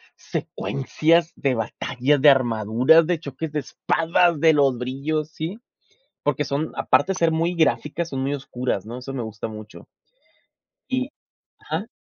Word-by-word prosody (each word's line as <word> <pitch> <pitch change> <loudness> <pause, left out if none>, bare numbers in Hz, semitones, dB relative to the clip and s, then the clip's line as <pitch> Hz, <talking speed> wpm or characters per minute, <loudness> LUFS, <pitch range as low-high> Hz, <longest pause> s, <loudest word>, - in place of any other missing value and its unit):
secuencias 165 +5 0
de 135 -2 0
batallas, 125 +5 0
de 150 - +8
armaduras, 125 +4 +4
de 175 -2 0
choques 150 +1 -6
de 150 - -1
espadas, 165 +4 +1
de 160 -1 +6
los 140 -4 +3
brillos, 140 +5 -2
sí 165 +8 -5 0.7
Porque 145 0 +1
son, 145 +3 -2
aparte 190 - +2
de 185 - -5
ser 165 -1 +3
muy 165 +2 0
gráficas, 160 0 0
son 135 -4 -4
muy 135 +1 -1
oscuras, 125 -6 -3
¿no? 120 +3 -6
Eso 130 +2 -7
me 130 - -3
gusta 110 0 -6
mucho. 110 0 -11 1.0
Y 255 0 -1 0.5
ajá. - - -4
145 Hz, 150 wpm, -23 LUFS, 125-165 Hz, 1.0 s, de